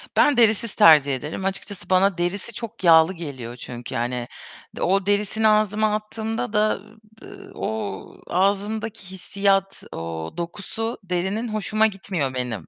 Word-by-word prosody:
Ben 290 -3 +4
derisiz 225 -1 +3
tercih 145 -4 +6
ederim. 150 +8 -5
Açıkçası 195 -1 -5
bana 190 0 +3
derisi 185 +6 -2
çok 230 -1 -8
yağlı 165 +1 +6
geliyor 130 -8 -7
çünkü, 120 -1 -8
yani, 120 +1 -2 0.5
o 195 +1 +2
derisini 205 +2 +1
ağzıma 215 0 +2
attığımda 220 +2 -4
da, 210 -1 +2
eee, 215 +2 -18 0.3
b - - -11
eee, - - -13
o 105 -3 -5
ağzımdaki 200 +1 -1
hissiyat, 195 +1 0
o 80 -1 -5
dokusu 205 +6 -4
derinin 190 +5 -2
hoşuma 215 0 +1
gitmiyor 185 -9 -3
benim. 120 -9 -4
195 Hz, 135 wpm, -23 LUFS, 155-215 Hz, 0.5 s, tercih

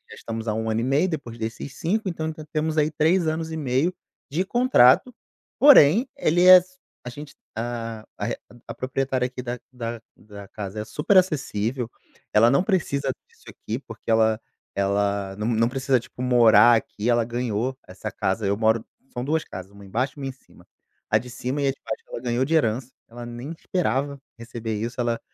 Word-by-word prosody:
estamos 115 0 -6
há 110 - +1
1 110 0 -2
ano 110 +1 0
e - - -2
meio, 140 +8 +2
depois 130 -8 -5
desses 115 +4 -6
5, 195 +4 -1
então 160 -2 -3 0.2
temos 155 0 -1
aí 150 0 +2
3 160 +3 +2
anos 160 +1 -2
e 160 - -4
meio 145 +5 0 0.4
de 165 +6 0
contrato, 240 - +4 0.5
porém, 245 - +7
ele 175 - +3
é 185 - +12
s 185 0 -4 0.3
a 125 - -6
gente, 145 +4 -10 0.2
hã, 115 -1 -4 0.6
a - - -5
proprietária 130 0 -1
aqui 125 0 -5
da 120 0 -4 0.2
da 115 -2 -5 0.2
da 100 -1 -12
casa 105 0 -6
é - - -6
superacessível, 135 - +1 0.4
ela 110 +2 +6
não 140 +6 +3
precisa 140 -9 0 0.2
disso - - -26
aqui, 115 +4 -5
porque 115 -5 -12
ela 110 -1 +3 0.4
ela 100 0 0
não 105 - -2
não 115 0 +2
precisa, 135 -1 +1
tipo, 125 - -11
morar 120 -2 +6
aqui, 110 0 -2
ela 120 -1 +3
ganhou 120 +1 -2
essa 90 - -7
casa. 100 +3 -1
Eu 100 - +2
moro 110 0 +2 0.3
são 125 - -3
2 155 +2 0
casas, 95 +1 -9
1 100 0 -14
embaixo 125 +7 -1
e - - -7
1 135 - -3
em 135 - -3
cima. 130 - -21 0.4
A 105 - +4
de 125 +3 -6
cima 130 +4 -3
e 140 - +2
a - - +3
de 135 - -14
baixo - - -5
ela - - -6
ganhou 125 +1 0
de 155 - -2
herança, 125 -2 +1 0.2
ela 120 +1 -9
nem 120 +5 -7
esperava 140 - -1 0.2
receber 115 -1 -5
isso, 120 +2 -4
ela 120 -1 0
125 Hz, 190 wpm, -24 LUFS, 115-150 Hz, 0.6 s, é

